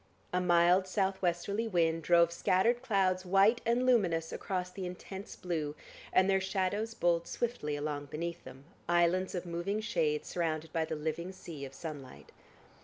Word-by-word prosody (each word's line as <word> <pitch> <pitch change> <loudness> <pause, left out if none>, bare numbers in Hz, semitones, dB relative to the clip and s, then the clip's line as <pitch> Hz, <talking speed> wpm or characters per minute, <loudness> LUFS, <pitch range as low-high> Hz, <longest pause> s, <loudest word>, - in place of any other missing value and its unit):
A 180 - +2
mild 175 +1 +4
south 190 0 0
westerly 195 +5 0
wind 165 -4 +1
drove 170 +1 +4
scattered 190 +8 +2
clouds, 190 -6 +1
white 195 +6 +4
and 240 +2 +2
luminous, 175 -10 +2
across 180 -1 -3
the 185 -1 -5
intense 190 +2 -8
blue, 155 -5 -3 0.4
and 185 - +4
their 195 -1 +3
shadows 200 +4 -1
bowled 170 -1 +1
swiftly 230 -12 -2
along 145 0 -3
beneath 170 +4 -5
them, 130 +1 -12 0.3
islands 175 +2 +2
of 180 - -3
moving 175 +5 -2
shade 160 -8 0
surrounded 160 -2 -2
by 165 -1 +1
the 160 - -4
living 160 +4 -3
sea 165 -6 -8
of 135 0 -11
sunlight. 145 -6 -8
180 Hz, 160 wpm, -32 LUFS, 165-195 Hz, 0.4 s, mild